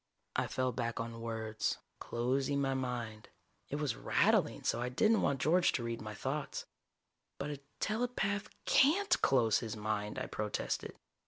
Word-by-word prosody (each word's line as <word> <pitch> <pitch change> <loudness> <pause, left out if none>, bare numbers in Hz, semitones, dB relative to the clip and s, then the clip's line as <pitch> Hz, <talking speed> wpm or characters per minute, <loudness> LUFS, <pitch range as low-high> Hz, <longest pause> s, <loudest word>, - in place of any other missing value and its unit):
_ - - -52 0.4
I - - -3
fell 130 0 0
back 115 -2 -2
on 115 0 -4
words, 110 -1 -2 0.2
closing 130 +4 0
my 135 -1 +1
mind 120 -4 -3 0.4
it - - -2
was 150 -2 0
rattling - - +2
so - - +1
I 125 - -1
didn't 215 - +3
want 140 -1 +1
George 175 +5 +4
to 120 - -1
read 115 0 -3
my 110 -1 -6
thoughts: - - -3 0.7
"But 145 +2 -3
a 145 - -5 0.2
telepath 215 -3 0 0.2
can't 370 +9 +4
close 120 -5 +4
his 115 -3 -4
mind!" 105 0 -2
I - - -2
protested. 105 -1 -2
125 Hz, 160 wpm, -34 LUFS, 115-145 Hz, 0.7 s, George